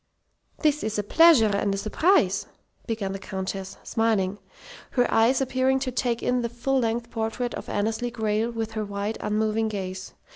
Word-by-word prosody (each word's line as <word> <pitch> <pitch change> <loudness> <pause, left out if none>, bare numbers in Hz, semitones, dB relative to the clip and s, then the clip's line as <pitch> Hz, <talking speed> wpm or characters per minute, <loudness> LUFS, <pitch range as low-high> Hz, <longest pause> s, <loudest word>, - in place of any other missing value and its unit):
"This 300 -1 +2
is 215 0 -2
a 210 - 0
pleasure 230 -5 +5
and 200 0 0
a - - -3
surprise," 215 - +2 0.4
began 215 -4 -2
the 195 - -5
Countess, 190 0 -5
smiling, 205 -3 0 0.6
her 245 - +5
eyes 235 +4 +4
appearing 260 0 +2
to 265 -1 -2
take 240 -1 -1
in 250 0 +1
the 235 - -2
full 255 +3 0
length 235 0 -1
portrait 230 +2 -2
of - - -7
Annesley 220 +4 -1
Grayle 220 -1 -1
with 225 -1 -4
their 215 -1 -2
wide, 205 +1 -4
unmoving 215 +1 0
gaze. 190 -2 -5
225 Hz, 170 wpm, -25 LUFS, 205-245 Hz, 0.6 s, pleasure